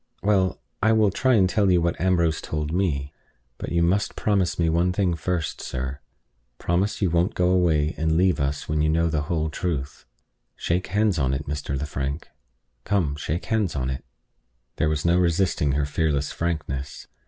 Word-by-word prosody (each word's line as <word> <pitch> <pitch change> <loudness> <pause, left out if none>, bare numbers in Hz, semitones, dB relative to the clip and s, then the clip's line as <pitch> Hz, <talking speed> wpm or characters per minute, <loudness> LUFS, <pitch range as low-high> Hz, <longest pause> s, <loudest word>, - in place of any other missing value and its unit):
"Well, 95 -2 +2 0.2
I 110 +2 +4
will 110 -3 +4
try 130 +6 +2
and 95 -4 +4
tell 100 +1 +2
you 90 -1 +4
what 85 0 -1
Ambrose 85 -3 +2
told 75 0 -3
me. 75 -7 -1 0.5
But - - -5
you 85 0 +2
must 95 +5 +1
promise 100 -4 +1
me 85 - +2
one 85 +3 +2
thing 90 -1 +1
first, 85 0 -2
sir. 65 +3 -4 0.6
Promise 95 +5 0
you 90 - +2
won't 85 +2 +1
go 90 0 +2
away 80 -5 +2
and 80 0 +1
leave 90 -1 +3
us 70 +1 -2
when 75 0 0
you 75 - +2
know 85 +1 +2
the 75 -2 0
whole 80 0 -1
truth. 70 -6 -4 0.5
Shake 90 +3 -1
hands 105 -3 +1
on 65 -1 +1
it, 70 +2 -4
Mr. 75 -1 -3
Lefrank; 70 +1 -4 0.5
come, 85 -7 0
shake 75 +3 -3
hands 105 -8 0
on 65 -1 -1
it." 65 - -5 0.7
There 75 - +2
was 75 0 -1
no 85 +1 +4
resisting 85 -4 +1
her 70 0 +1
fearless 75 -1 0
frankness. 75 -5 -3
85 Hz, 180 wpm, -24 LUFS, 75-90 Hz, 0.7 s, I